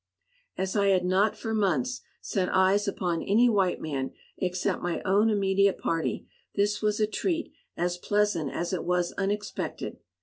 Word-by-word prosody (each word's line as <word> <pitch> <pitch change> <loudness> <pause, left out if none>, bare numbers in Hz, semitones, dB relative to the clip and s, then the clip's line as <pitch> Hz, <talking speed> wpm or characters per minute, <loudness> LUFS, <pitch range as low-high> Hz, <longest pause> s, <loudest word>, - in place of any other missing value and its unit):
As 190 +1 -2
I 200 -1 +3
had 185 -2 +3
not 190 +4 +2
for 225 -1 -3
months 150 - +1 0.2
set 185 -2 -1
eyes 190 +2 +3
upon 175 -4 -1
any 225 +5 +4
white 195 -6 +2
man 135 -4 -3 0.3
except 180 -1 -1
my 175 -1 -1
own 200 +3 +3
immediate 200 -1 +2
party, 165 -1 -2 0.3
this 205 +1 +1
was 210 0 +1
a 215 - +4
treat 325 - -2 0.2
as 175 0 -1
pleasant 205 -8 +1
as 175 +2 -3
it 185 - -1
was 180 -1 +1
unexpected. 205 +1 -3
195 Hz, 160 wpm, -28 LUFS, 175-210 Hz, 0.3 s, any